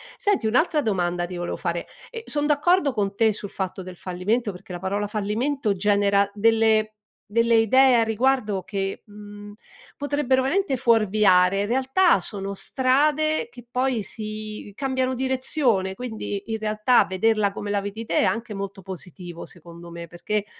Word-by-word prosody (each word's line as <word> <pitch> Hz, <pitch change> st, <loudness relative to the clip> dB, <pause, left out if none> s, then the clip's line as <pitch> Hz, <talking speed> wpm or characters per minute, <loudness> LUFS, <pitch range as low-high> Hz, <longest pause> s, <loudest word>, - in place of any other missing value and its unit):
Senti, 405 Hz, -, +1 dB
un'altra 300 Hz, +7 st, +2 dB
domanda 175 Hz, -6 st, -1 dB
ti 180 Hz, +1 st, -7 dB
volevo 175 Hz, 0 st, -4 dB
fare. 170 Hz, -1 st, -3 dB, 0.2 s
E 460 Hz, -1 st, -8 dB
sono 295 Hz, 0 st, 0 dB
d'accordo 300 Hz, 0 st, +2 dB
con 200 Hz, -3 st, -1 dB
te 220 Hz, -1 st, +3 dB
sul 205 Hz, -1 st, -7 dB
fatto 190 Hz, -1 st, -5 dB
del 185 Hz, -1 st, -10 dB
fallimento, 205 Hz, +6 st, -2 dB
perché 180 Hz, +1 st, -13 dB
la 175 Hz, -, -5 dB
parola 200 Hz, +2 st, -2 dB
fallimento 215 Hz, +3 st, -1 dB
genera 200 Hz, 0 st, +2 dB
delle 220 Hz, 0 st, +2 dB, 0.4 s
delle 230 Hz, +1 st, +3 dB
idee 255 Hz, +4 st, +5 dB
a -, -, +4 dB
riguardo 225 Hz, -3 st, 0 dB
che, 195 Hz, 0 st, -4 dB
mhmm, 205 Hz, 0 st, -11 dB, 0.4 s
potrebbero 285 Hz, -2 st, 0 dB
veramente 285 Hz, +2 st, 0 dB
fuorviare. 210 Hz, -5 st, +3 dB
In 205 Hz, -, -1 dB
realtà 265 Hz, -, +3 dB
sono 195 Hz, +1 st, -3 dB
strade 300 Hz, -, +1 dB
che 245 Hz, -, -14 dB
poi 250 Hz, -4 st, 0 dB
si 215 Hz, -1 st, -6 dB
cambiano 260 Hz, 0 st, -1 dB
direzione, 255 Hz, -6 st, +1 dB
quindi 220 Hz, -3 st, -5 dB
in 220 Hz, -, -1 dB
realtà 215 Hz, +3 st, +3 dB
vederla 205 Hz, +1 st, +1 dB
come 205 Hz, -, -6 dB
la 205 Hz, -, +1 dB
vedi 205 Hz, +3 st, -6 dB
te -, -, -1 dB
è -, -, +3 dB
anche 230 Hz, -1 st, -2 dB
molto 195 Hz, 0 st, -6 dB
positivo, 180 Hz, -1 st, -8 dB
secondo 170 Hz, -1 st, -12 dB
me, 170 Hz, 0 st, -8 dB
perché, 205 Hz, +5 st, -3 dB
215 Hz, 155 wpm, -24 LUFS, 195-255 Hz, 0.4 s, idee